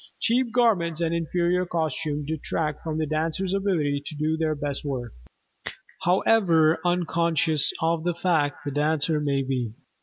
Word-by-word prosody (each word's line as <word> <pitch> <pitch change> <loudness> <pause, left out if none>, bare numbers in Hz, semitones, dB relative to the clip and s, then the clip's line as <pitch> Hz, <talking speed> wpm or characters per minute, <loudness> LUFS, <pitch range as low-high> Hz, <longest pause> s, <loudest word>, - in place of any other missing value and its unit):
Cheap 240 0 +1
garments 195 -10 +2
and 165 -1 0
inferior 175 +2 +1
costumes 155 -3 -2
detract 155 0 -2
from 155 -1 -3
the 160 - 0
dancer's 160 +5 -1
ability 165 -8 0
to 155 - -6
do 155 +2 0
the 160 -1 0
best 145 -1 -4
work, 130 -5 -4 0.9
however 175 -4 +3
unconscious 170 -3 +1
of 165 0 +1
this 175 -1 -1
fact 150 -6 0
the 145 - -2
dancer 150 +2 +1
may 140 -2 0
be. 125 -4 -2
160 Hz, 145 wpm, -25 LUFS, 150-175 Hz, 0.9 s, however